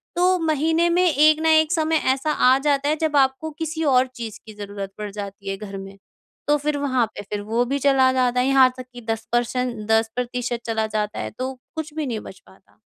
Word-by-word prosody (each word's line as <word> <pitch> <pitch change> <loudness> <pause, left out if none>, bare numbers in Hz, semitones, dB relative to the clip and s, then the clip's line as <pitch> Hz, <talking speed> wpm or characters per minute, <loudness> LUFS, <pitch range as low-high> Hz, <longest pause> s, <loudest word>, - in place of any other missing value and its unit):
तो 360 +1 +3
महीने 320 +2 +2
में 350 +2 +3
एक 305 +2 +5
न - - -2
एक 315 0 +4
समय 320 -2 +1 0.2
ऐसा 290 +3 -2 0.2
आ 260 - +5
जाता 285 0 +1
है 305 - +2
जब 315 -2 0
आपको 270 +3 +1
किसी 320 0 -3
और 255 +1 +4
चीज़ 225 -3 -7
की 220 - -11
ज़रूरत 200 -1 -7
पड़ 210 -1 -5
जाती 200 -1 -7
है 195 - -3
घर 200 -1 -7
में,।तो 195 +9 -5
फिर 295 0 -1
वहाँ 260 -4 +1
पे - - -5
फिर 205 -1 -3
वो 225 +4 0
भी 275 +3 -1
चला 270 -1 +4
जाता 250 -1 +1
है 255 - +1
यहाँ 270 -1 +6
तक 255 - -7
की 245 - -9
10%, 240 +2 -1 0.2
10% 240 +2 -1
चला 220 -1 -1
जाता 210 -1 -3
है। - - -4
तो 260 +1 -2 0.2
कुछ 310 -1 -5
भी 310 -1 -3
नहीं 235 -5 -3
बच - - -11
पाता। - - -23
255 Hz, 215 wpm, -22 LUFS, 220-300 Hz, 0.2 s, यहाँ